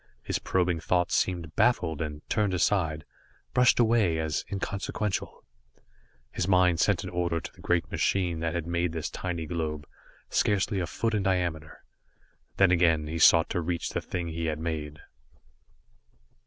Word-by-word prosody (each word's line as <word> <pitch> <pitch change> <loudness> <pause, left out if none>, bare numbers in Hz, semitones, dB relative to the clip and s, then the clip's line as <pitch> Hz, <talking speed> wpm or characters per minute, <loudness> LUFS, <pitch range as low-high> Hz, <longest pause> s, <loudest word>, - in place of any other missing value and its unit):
His - - -2
probing 90 -2 0
thoughts 90 +2 0
seemed 85 -4 -1
baffled 80 -11 +2
and 75 -1 -5
turned 105 -4 +1
aside, 80 -5 0 0.5
brushed 125 -1 +4
away, 110 -8 +3
as 80 -1 -1
inconsequential. 100 +1 -3 0.9
His 90 - -2
mind 90 -3 +4
sent - - +2
an - - -6
order 85 -1 -1
to - - -8
the - - -17
great 90 -1 0
machine 90 -4 0
that 80 0 -2
had 85 -2 -2
made 85 0 -1
this 80 -2 -4
tiny 85 -3 -4
globe, 75 -2 -3 0.4
scarcely 100 0 +1
a 85 - -2
foot 115 +7 -2
in 105 - +1
diameter. 90 -5 -2 0.7
Then 95 -2 +5
again 85 -3 +3
he 80 +2 -4
sought 80 +1 +6
to 90 - 0
reach 85 +1 -2
the - - -2
thing 85 -2 -4
he 80 0 -3
had 75 -1 -1
made. 75 -2 -4
85 Hz, 155 wpm, -28 LUFS, 80-95 Hz, 0.9 s, sought